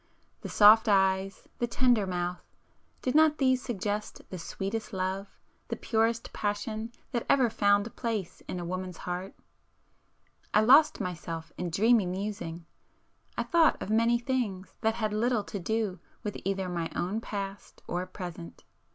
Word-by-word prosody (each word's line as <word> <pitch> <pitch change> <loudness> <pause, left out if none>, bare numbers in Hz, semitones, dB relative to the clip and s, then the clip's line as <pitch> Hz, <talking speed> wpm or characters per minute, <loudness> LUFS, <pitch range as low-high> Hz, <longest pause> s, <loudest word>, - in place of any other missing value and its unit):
the - - -6
soft 215 +1 +7
eyes,—the 195 +3 +1
tender 240 -4 +2
mouth,—did 180 +7 -5
not 310 0 +5
these 260 -2 +3
suggest 210 -3 -3
the 185 - -5
sweetest 210 +6 -4
love, 190 +1 -3 0.3
the - - -2
purest 225 +1 0
passion 215 +2 -3 0.2
that 240 - -1
ever 255 -5 +4
found 205 0 +2
place 220 -7 -3
in 180 - -4
a 175 - -4
woman's 185 0 -4
heart? 180 +2 -5 1.2
I 215 - +7
lost 275 +8 +6
myself 165 -2 -5
in 180 - -3
dreamy 215 +3 +4
musing,—I 175 -3 -7
thought 335 -2 +4
of 210 - -4
many 230 +2 +4
things 235 -7 -2
that 220 -1 +1
had 215 -2 -1
little 225 0 +1
to 200 - -6
do 210 -1 -1 0.2
with 210 - -3
either 195 -1 -1
my 170 -2 -2
own 195 +6 -1
past 200 -2 -6
or 175 +1 -2
present. 175 - -8
205 Hz, 140 wpm, -29 LUFS, 185-230 Hz, 1.2 s, soft